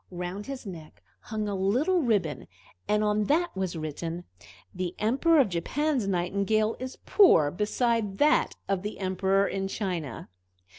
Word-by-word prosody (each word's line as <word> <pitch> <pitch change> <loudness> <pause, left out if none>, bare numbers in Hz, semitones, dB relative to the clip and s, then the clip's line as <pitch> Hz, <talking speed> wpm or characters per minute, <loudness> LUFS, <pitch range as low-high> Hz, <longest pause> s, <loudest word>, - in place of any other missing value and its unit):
Round 180 +3 -5
his 275 -3 -6
neck 165 -5 -10 0.2
hung 215 -1 -4
a 205 - -2
little 250 - +2
ribbon, 195 - 0 0.4
and 210 0 +2
on 210 0 +1
that 335 - +1
was 190 -2 -2
written, 165 +2 -5 0.5
"The 180 -1 -4
Emperor 275 +10 +3
of 255 -7 +4
Japan's 255 - -1
Nightingale 200 +4 +1
is 255 0 -6
poor 165 - +5
beside 210 - 0
that 300 +1 +3
of 195 -2 0
the 210 +2 -5
Emperor 190 +1 +1
in 195 0 -2
China." 180 -8 -4
200 Hz, 145 wpm, -27 LUFS, 180-230 Hz, 0.5 s, poor